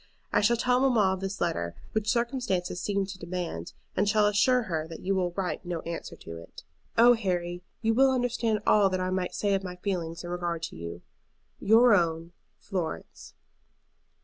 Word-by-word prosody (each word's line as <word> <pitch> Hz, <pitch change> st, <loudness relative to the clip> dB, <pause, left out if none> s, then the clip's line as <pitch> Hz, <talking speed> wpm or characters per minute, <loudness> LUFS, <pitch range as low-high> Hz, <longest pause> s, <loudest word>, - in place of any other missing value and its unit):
I -, -, +4 dB
shall 235 Hz, +3 st, +3 dB
tell 250 Hz, +2 st, +2 dB
mamma 230 Hz, -8 st, +3 dB
of 190 Hz, -, -4 dB
this 195 Hz, +1 st, -4 dB
letter, 85 Hz, -, -1 dB, 0.2 s
which 215 Hz, -1 st, -1 dB
circumstances 235 Hz, -8 st, -1 dB
seem 200 Hz, -1 st, 0 dB
to 190 Hz, -1 st, -9 dB
demand, 170 Hz, -, -5 dB, 0.2 s
and 205 Hz, -, +2 dB
shall 210 Hz, 0 st, +4 dB
assure 210 Hz, +5 st, +3 dB
her 160 Hz, -6 st, -3 dB
that 165 Hz, -, -9 dB
you 195 Hz, -, 0 dB
will 185 Hz, -2 st, +1 dB
write 185 Hz, -1 st, -3 dB
no 175 Hz, -2 st, -4 dB
answer 170 Hz, 0 st, -6 dB
to 85 Hz, 0 st, -9 dB
it. 85 Hz, -, -12 dB, 0.3 s
"Oh, 240 Hz, +2 st, +8 dB
Harry, 175 Hz, -5 st, -2 dB, 0.2 s
you 225 Hz, 0 st, +3 dB
will 265 Hz, +3 st, +5 dB
understand 240 Hz, -4 st, 0 dB
all 205 Hz, -2 st, +5 dB
that 185 Hz, 0 st, -1 dB
I 185 Hz, 0 st, -1 dB
might 185 Hz, -1 st, -2 dB
say 205 Hz, -1 st, +1 dB
of 195 Hz, 0 st, 0 dB
my 180 Hz, -1 st, -6 dB
feelings 180 Hz, -3 st, -3 dB
in 175 Hz, -, -6 dB
regard 175 Hz, -2 st, -3 dB
to -, -, -5 dB
you. 85 Hz, +1 st, -7 dB, 0.6 s
"Your 225 Hz, +3 st, +6 dB
own, 165 Hz, -3 st, +1 dB, 0.3 s
FLORENCE." 175 Hz, -, -5 dB
190 Hz, 185 wpm, -28 LUFS, 175-220 Hz, 0.6 s, Oh